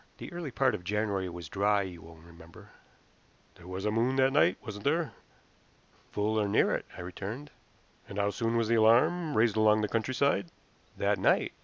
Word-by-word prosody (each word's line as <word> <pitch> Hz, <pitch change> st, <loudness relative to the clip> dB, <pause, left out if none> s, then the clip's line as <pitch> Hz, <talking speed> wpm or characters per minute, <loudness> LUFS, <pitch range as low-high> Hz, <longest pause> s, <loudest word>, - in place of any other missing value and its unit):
The -, -, -9 dB
early 170 Hz, -4 st, -5 dB
part 130 Hz, 0 st, +1 dB
of 90 Hz, -, -5 dB
January 100 Hz, -1 st, -1 dB
was 85 Hz, -2 st, -8 dB
dry, 100 Hz, +3 st, +1 dB
you 90 Hz, -3 st, -8 dB
will 80 Hz, 0 st, -14 dB
remember." 85 Hz, 0 st, -16 dB, 0.8 s
"There 85 Hz, -, -16 dB
was 95 Hz, +2 st, -5 dB
a 105 Hz, -, +1 dB
moon 120 Hz, +4 st, +1 dB
that 135 Hz, 0 st, +3 dB
night, 115 Hz, -11 st, +4 dB
wasn't 105 Hz, -2 st, -7 dB
there?" 155 Hz, -1 st, +1 dB, 1.0 s
"Full, 110 Hz, +1 st, 0 dB
or 105 Hz, -, 0 dB
near 100 Hz, -, +2 dB
it," -, -, -3 dB
I -, -, -6 dB
returned. 100 Hz, +10 st, -7 dB, 0.6 s
"And 100 Hz, -, -7 dB
how 100 Hz, 0 st, +1 dB
soon 115 Hz, +2 st, -1 dB
was 115 Hz, -1 st, +1 dB
the 115 Hz, -, +1 dB
alarm 145 Hz, +9 st, +3 dB
raised 110 Hz, -1 st, +3 dB
along 110 Hz, 0 st, +4 dB
the 105 Hz, -, 0 dB
countryside?" 115 Hz, -2 st, 0 dB, 0.5 s
"That -, -, +1 dB
night. -, -, +2 dB
105 Hz, 185 wpm, -30 LUFS, 95-125 Hz, 1.0 s, night